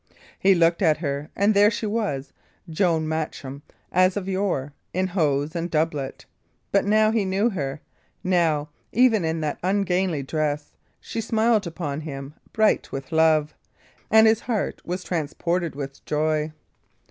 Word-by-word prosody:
He 195 0 +5
looked 170 +1 +3
at 160 -5 +4
her, 145 -1 -3
and 205 +2 +3
there 205 +1 +6
she 220 +1 -3
was 205 -11 -2 0.3
John 165 -1 +1
Matcham, 150 -3 -4 0.3
as 185 +2 +3
of 195 -2 -3
yore, 185 -8 -1 0.2
in 185 +1 +1
hose 155 -5 0
and 170 +1 -2
doublet. 155 -4 -2 0.5
But 200 - +3
now 215 +1 +4
he 220 -2 +1
knew 195 +5 +1
her; 140 -6 -4 0.4
now, 165 -5 +1 0.2
even 230 -5 +4
in 160 0 -1
that 150 -2 -2
ungainly 185 -4 0
dress, 150 0 -2 0.3
she 225 - -4
smiled 220 -2 +2
upon 155 -3 -4
him, 140 -2 -7 0.2
bright 220 -1 +2
with 135 -1 -6
love; 160 -1 +3 0.6
and 220 0 +7
his 220 0 +4
heart 230 -5 -2
was 180 +1 -4
transported 170 +1 -2
with 140 -1 -7
joy. 155 0 0
170 Hz, 145 wpm, -24 LUFS, 150-200 Hz, 0.6 s, and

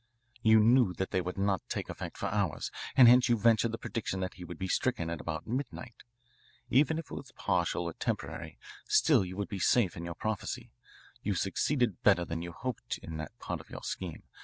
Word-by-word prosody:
"You 110 -1 +6
knew 115 -3 +5
that 95 - -3
they 95 - +1
would 90 +2 -5
not 100 -1 +1
take - - -3
effect - - -6
for - - -3
hours, - - -1 0.3
and 130 -3 +10
hence 125 +1 +7
you 120 - +4
ventured 115 +1 +4
the 115 - -3
prediction 105 -5 -3
that 95 - -3
he 90 - -10
would 85 -1 -8
be 95 - -3
stricken 110 -5 0
at 85 - -4
about 80 0 -4
midnight. 125 -1 -5 0.7
Even 150 +5 +4
if 165 - -6
it - - -6
was 135 -1 -7
partial 90 -2 0
or 85 -1 -4
temporary, - - -4 0.3
still - - +5
you 90 +1 -7
would 100 - -2
be 100 -3 -5
safe 100 0 +3
in 85 - -6
your 85 -1 -5
prophecy. 110 -2 -3 0.5
You 100 -1 -1
succeeded 110 +3 0
better 95 -4 +4
than 85 0 -4
you 85 0 -5
hoped 125 +7 -4
in 80 -1 -6
that 80 -1 -7
part - - -4
of - - -19
your - - -8
scheme. 90 -4 -5
100 Hz, 210 wpm, -31 LUFS, 85-120 Hz, 0.7 s, and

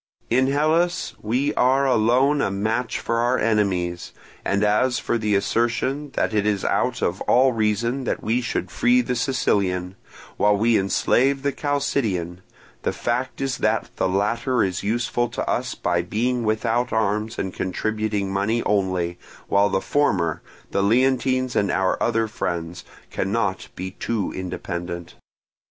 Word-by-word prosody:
In 130 +2 +3
Hellas 155 +3 +1
we 125 +7 0
are 135 +2 +3
alone 130 +4 +3
a - - +1
match 110 +5 -1
for 115 - -1
our 120 +2 +2
enemies; 95 -6 0 0.3
and 100 +1 +1
as 115 +5 +2
for 120 - -1
the 105 -2 +1
assertion 120 +8 0
that - - 0
it 105 -1 +1
is 100 -2 0
out - - 0
of - - -1
all 130 +1 +5
reason 115 +4 0
that - - -2
we 115 +3 +1
should 105 -6 -3
free 125 +1 +3
the 125 +1 -2
Sicilian, 100 -8 0 0.4
while 105 0 +3
we 115 +2 +3
enslave 130 +7 +2
the 140 - +1
Chalcidian, 115 - -1 0.4
the - - 0
fact 125 +3 -2
is 135 -3 -1
that - - 0
the - - +1
latter 115 +6 +1
is 95 -2 -2
useful 120 +3 0
to - - -4
us - - -1
by 85 0 0
being 120 +7 -1
without 115 +3 0
arms 110 +1 0
and 95 -1 -3
contributing 105 +1 -2
money 110 +4 0
only; 95 -4 0 0.3
while 100 +1 +4
the 95 0 0
former, 85 - +1 0.3
the 100 - +1
Leontines 130 +3 +2
and 100 - +2
our 95 0 0
other 115 -1 +1
friends, 85 -4 -4 0.3
cannot 100 -1 -1
be 95 +1 -5
too 105 0 -3
independent. 85 -2 -5
110 Hz, 150 wpm, -23 LUFS, 95-125 Hz, 0.4 s, all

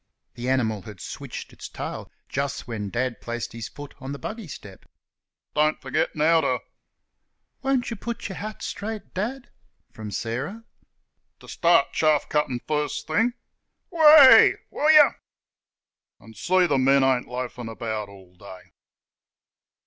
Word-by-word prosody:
(the 125 +1 -4
animal 110 -6 0
had 105 -3 -11
switched - - -8
its - - -9
tail - - -7 0.2
just 140 0 -3
when 105 -4 -4
Dad 125 +2 -2
placed 120 -1 -5
his 115 -2 -6
foot 145 -1 -11
on 135 +1 -6
the - - -6
buggy 220 +4 -7
step) 100 -9 -11 0.7
"don't 155 +1 +2
f'get - - -2
now 160 +2 +4
ter 130 -4 0 0.5
" - - -53
("Won't 265 -3 0
you - - -3
put 235 +3 -5
your 190 - -7
hat 215 +1 -7
straight, 210 0 -6
Dad?" 240 +7 -4 0.4
from 110 -1 -8
Sarah) 130 - -4 0.8
"ter - - -16
start 170 -4 +2
chaff 155 -2 +2
cuttin' 140 -5 -1
first 150 -1 -2
thing 225 +10 +1 0.6
WEH! 305 -5 +8 0.2
Will 300 - +1
yer 305 -2 +6 1.0
an' 110 0 -15
see 180 - +2
th' 145 -5 +1
men 135 +1 +4
ain't 130 -2 +1
loafin' 125 -1 -5
about 110 -2 -4
all 95 -2 -16
day." 95 0 -13
140 Hz, 145 wpm, -24 LUFS, 115-195 Hz, 1.0 s, WEH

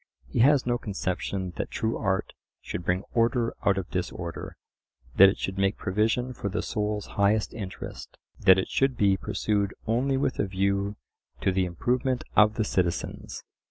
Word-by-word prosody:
He 65 - -3
has 140 +3 +5
no 120 0 0
conception 95 -2 -3
that - - -3
true 115 -1 -1
art 95 -2 -1 0.3
should 90 - -5
bring 90 +2 0
order 115 0 +2
out 100 -1 +3
of 95 -1 -4
disorder; 85 -2 -4 0.6
that 95 0 +10
it 95 - -3
should 95 0 -3
make 100 +1 +1
provision 110 +6 0
for 100 -4 -4
the 105 +2 -2
soul's 105 0 -2
highest 105 +1 +1
interest; 100 -4 -7 0.2
that 95 0 +7
it 95 - 0
should 135 -2 +1
be 100 -2 +4
pursued 100 0 -1
only 130 +5 +1
with 135 -2 -1
a - - +1
view 100 +1 0 0.5
to 95 - +2
"the 95 0 +1
improvement 125 +8 -1
of 105 0 +5
the 110 - +1
citizens." 90 -4 -2
100 Hz, 165 wpm, -27 LUFS, 95-115 Hz, 0.6 s, that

